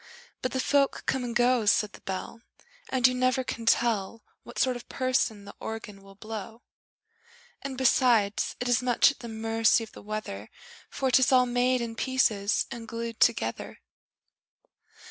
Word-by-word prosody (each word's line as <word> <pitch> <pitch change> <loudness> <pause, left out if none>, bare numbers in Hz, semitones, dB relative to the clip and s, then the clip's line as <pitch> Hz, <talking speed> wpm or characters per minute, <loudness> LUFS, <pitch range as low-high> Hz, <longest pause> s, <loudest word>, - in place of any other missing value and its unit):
But 255 - -2
the 260 - -2
folk 280 +1 +1
come 265 -1 -1
and 240 -1 -5
go, 240 -2 +2
Said 210 0 +3
the - - -13
Bell, 195 +4 -6 0.5
And 260 -1 +4
you 255 - 0
never 255 +1 +1
can 230 -2 -6
tell 225 -2 +1 0.2
What 240 - -12
sort 255 -1 +2
of 245 - -10
person 255 -5 -1
the 200 - -10
Organ 215 -3 -7
will 195 0 -16
blow! 220 +2 -8 1.0
And, 270 -1 -6
besides, 240 -5 +2
it 245 - -3
is 245 +1 +2
much 250 +2 +4
at - - -15
the 235 - -8
mercy 225 +1 +2
of 220 - -11
the - - -12
weather 205 - -6 0.4
For 265 -1 -1
'tis 260 +1 +4
all 255 -1 +5
made 250 +1 +1
in 230 -1 -5
pieces 225 -5 +1
and 235 -2 -7
glued 230 0 -5
together! 115 - 0
235 Hz, 165 wpm, -27 LUFS, 215-255 Hz, 1.0 s, all